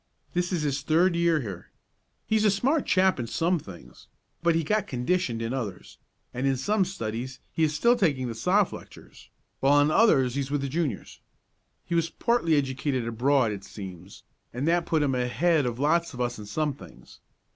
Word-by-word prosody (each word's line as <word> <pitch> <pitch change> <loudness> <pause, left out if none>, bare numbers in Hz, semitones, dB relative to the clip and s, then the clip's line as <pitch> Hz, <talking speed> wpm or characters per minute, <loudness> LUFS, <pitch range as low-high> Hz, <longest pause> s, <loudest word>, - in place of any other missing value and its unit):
This 175 0 -1
is 170 -4 -1
his 140 -1 -1
third 170 +5 +2
year 170 -2 +2
here. 100 -7 -8 0.6
He's 220 -1 +1
a 215 - +5
smart 265 +10 +1
chap 185 -4 +3
in 120 - -3
some 170 +7 0
things, 85 - -13 0.3
but 170 -1 +2
he 165 - +1
got 210 +7 0
conditioned 125 -2 -1
in 115 +2 -3
others, 110 -8 -6 0.3
and 130 +2 -1
in 135 -1 +1
some 195 +9 +1
studies 125 - -5
he 160 - 0
is 150 -1 -2
still 235 +8 +4
taking 145 - 0
the 115 - -4
Soph. 185 - +1
lectures, - - -13 0.3
while 140 +2 +4
in 145 +1 +3
others 135 - +4
he 140 - -2
is 135 - -5
with 145 0 -1
the 140 - -3
Juniors. 145 - -3 0.7
He 175 - -5
was 165 -1 +1
partly 235 -9 +1
educated 135 -2 -1
abroad, 120 +1 +2
it 100 -2 -6
seems, 95 -2 -10 0.3
and 130 +5 -3
that 170 0 +2
put 160 -2 +2
him 140 -2 +1
ahead 140 +4 +1
of 120 -1 -3
lots 165 +3 +1
of - - -9
us 120 -2 -2
in 105 - -9
some 150 +6 -1
things. - - -15
145 Hz, 195 wpm, -26 LUFS, 125-170 Hz, 0.7 s, a